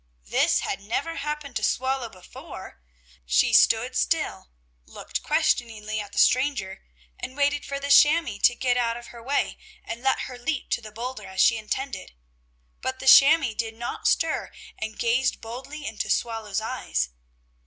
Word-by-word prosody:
This - - +2
had 195 - -3
never 275 +11 -3
happened 300 -2 -5
to - - -5
Swallow 260 -2 0
before! 185 - -11 0.4
She - - +2
stood - - +4
still, 60 0 -1 0.4
looked - - -5
questioningly 215 -2 0
at 205 -1 -7
the - - -11
stranger 255 -7 +2 0.4
and 260 - -7
waited 285 0 +1
for 280 0 -4
the 280 0 -3
chamois 295 -8 +5
to 245 - +5
get 245 0 +1
out 235 -1 0
of 240 - -11
her 235 - -11
way 270 +5 -1 0.3
and 230 +1 -6
let 265 +1 +1
her 250 -1 -7
leap 280 +3 -3
to - - 0
the 215 -1 -10
boulder, 230 -1 -6
as 190 0 -8
she 230 - +5
intended. 220 - -4 0.7
But 260 0 -3
the - - -8
chamois 275 -1 +7
did 225 -1 -3
not 240 +1 -4
stir 325 -1 +1 0.2
and 220 0 -6
gazed 245 +2 +1
boldly 265 +6 -8
into 220 - -4
Swallow's 220 -3 -1
eyes. 65 - -2
240 Hz, 165 wpm, -25 LUFS, 215-275 Hz, 0.7 s, chamois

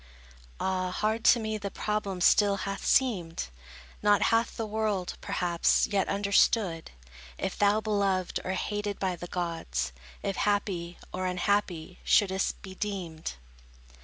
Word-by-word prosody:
Ah, 185 -1 0
hard 215 +4 -1
to 240 - +7
me 220 -1 -2
the 200 0 -4
problem 200 -2 -2
still 200 +2 +5
hath 195 0 -4
seemed; 180 - +1 0.5
Not 205 -1 +4
hath 230 +1 +1
the 225 - -2
world, 210 -4 -1
perhaps, 175 -2 +2
yet 195 -2 0
understood, 200 -3 +2 0.5
If 190 - -3
thou 205 +1 +3
beloved, 200 -4 0
or 185 - -2
hated 205 +1 -2
by 185 -2 -1
the 175 +1 -8
gods, 165 - -2 0.3
If 195 - -2
happy, 190 -4 0 0.2
or 185 0 -1
unhappy 180 -2 -1
shouldst 190 -1 +2
be 190 -1 -8
deemed. 185 -6 -4
195 Hz, 135 wpm, -29 LUFS, 180-210 Hz, 0.5 s, to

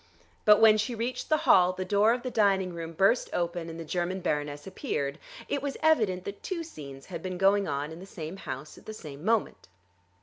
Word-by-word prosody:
But 210 -1 +7
when 220 -1 +7
she 235 +3 -1
reached 245 +3 -3
the 310 - +4
hall 180 -1 +6
the 185 0 -4
door 205 +3 +4
of 240 +1 -1
the 255 - -3
dining 195 -5 +2
room 165 -1 -6
burst 195 +8 +3
open, 170 -1 -2
and 165 0 -7
the 165 - -6
German 180 +3 -2
baroness 145 -4 -2
appeared. 155 - -3 0.3
It 285 - -1
was 280 -2 -3
evident 215 -13 +3
that 200 0 -6
two 350 -3 -3
scenes 140 - -10
had 170 -3 -7
been 185 0 -4
going 195 +1 +3
on 145 +1 -2
in 160 - -9
the 190 - -10
same 165 0 -7
house 135 -3 -7
at - - -21
the 215 - -6
same 150 -5 -9
moment. 225 - 0
185 Hz, 215 wpm, -28 LUFS, 165-215 Hz, 0.3 s, But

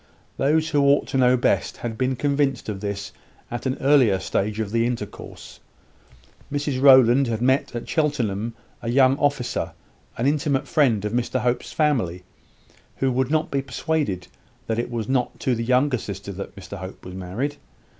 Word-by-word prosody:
Those 155 +3 +2
who 145 -3 +2
ought 140 +1 +4
to - - -1
know 125 0 +5
best 120 - 0
had 115 -2 -4
been 130 +2 0
convinced 140 -2 0
of 100 -2 -4
this 100 0 -4 0.4
at 120 +2 -3
an 130 - -1
earlier 135 -8 +4
stage 100 +2 -2
of 105 -2 -2
the 115 +1 +2
intercourse. 120 -1 -7 0.9
Mrs 145 -2 -1
Rowland 130 -1 +7
had 115 -2 -1
met 130 +1 +1
at 120 - -5
Cheltenham 115 -8 -1 0.3
a 115 - -4
young 130 +1 +5
officer, 140 -4 -1 0.4
an 115 - -1
intimate 145 -1 +1
friend 120 -8 +2
of 105 - -2
Mr 125 +1 0
Hope's 125 0 -1
family, 115 - 0 0.7
who 135 -1 0
would 130 +1 0
not 155 +1 0
be 140 - +1
persuaded 130 - -2 0.4
that 110 0 -1
it 120 - -2
was 115 -3 -3
not 130 -2 -1
to 130 - +1
the 115 -1 -2
younger 125 +2 +2
sister 100 -1 -6
that 100 +1 -7
Mr 100 0 -9
Hope 95 +1 -9
was 90 - -8
married. 100 +11 -4
125 Hz, 175 wpm, -23 LUFS, 110-140 Hz, 0.9 s, Rowland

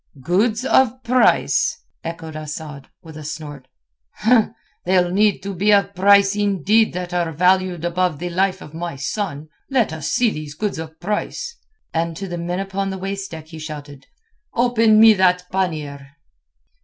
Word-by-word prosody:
"Goods 215 - +1
of 260 -1 +3
price?" 250 +1 +2 0.2
echoed 165 -1 -6
Asad, 150 -2 -7
with 160 -2 -12
a 155 - -8
snort. 145 -3 -7 1.2
"They'll 180 -1 +2
need 205 +1 +2
to 200 0 -4
be 200 +4 +2
of 200 -1 +3
price 200 +1 +5
indeed 205 +2 +2
that 180 0 -5
are 175 -2 0
valued 180 +1 +2
above 175 -2 0
the 175 +3 -5
life 190 +2 0
of 150 - -13
my 170 -1 -5
son. 150 +1 -4 0.2
Let 245 - +1
us 155 -2 -4
see 240 -3 +2
these 150 -3 -7
goods 205 -1 -3
of 160 0 -8
price." 210 - -3 0.4
And 165 0 -1
to 195 - -5
the 175 -1 -5
men 175 +2 -3
upon 195 0 -2
the 190 - -4
waist 195 +1 -4
deck 160 -1 -9
he 160 -1 -9
shouted, 145 -3 -9 0.5
"Open 230 -3 +4
me 220 0 +9
that 180 -2 +2
pannier." 155 -7 -3
180 Hz, 160 wpm, -20 LUFS, 160-200 Hz, 1.2 s, me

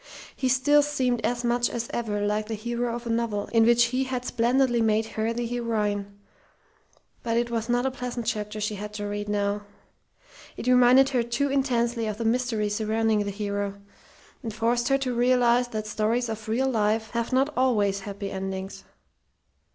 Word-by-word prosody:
He 260 - -1
still 290 +3 +4
seemed 260 -5 0
as 240 0 -1
much 240 0 +1
as 235 -1 -4
ever 205 -3 -1
like 210 +1 -1
the 225 - -3
hero 235 +2 -2
of 240 0 -7
a - - -4
novel 225 -3 -1
in 225 -1 +5
which 240 0 +5
he 265 +1 +1
had 255 -1 -3
splendidly 240 +1 +2
made 220 0 +2
her 220 +1 -1
the 240 +1 -2
heroine; 210 -4 -2 1.0
but 230 -1 -1
it 235 0 0
was 230 0 -2
not 245 +1 +1
a 265 - +1
pleasant 250 -2 -5
chapter 215 -2 -3
she 210 0 -1
had 210 +1 -6
to 205 -1 -4
read 205 0 -4
now. 205 0 0 1.0
It - - -6
reminded 250 +2 +6
her 255 -3 +1
too 240 +4 -1
intensely 240 -4 0
of 210 -1 -3
the 230 - -3
mystery 230 -2 +1
surrounding 215 0 +1
the - - -2
hero, 200 0 -3 0.6
and 230 -4 -4
forced 235 +2 0
her 275 - +3
to 260 -2 -2
realize 245 0 +3
that 215 -3 -4
stories 225 +3 0
of 220 0 -6
real 255 +4 +1
life 220 -2 0
have 235 +1 -2
not 270 +3 +1
always 210 -6 +2
happy 200 0 -6
endings. 195 0 -5
230 Hz, 180 wpm, -26 LUFS, 210-245 Hz, 1.0 s, reminded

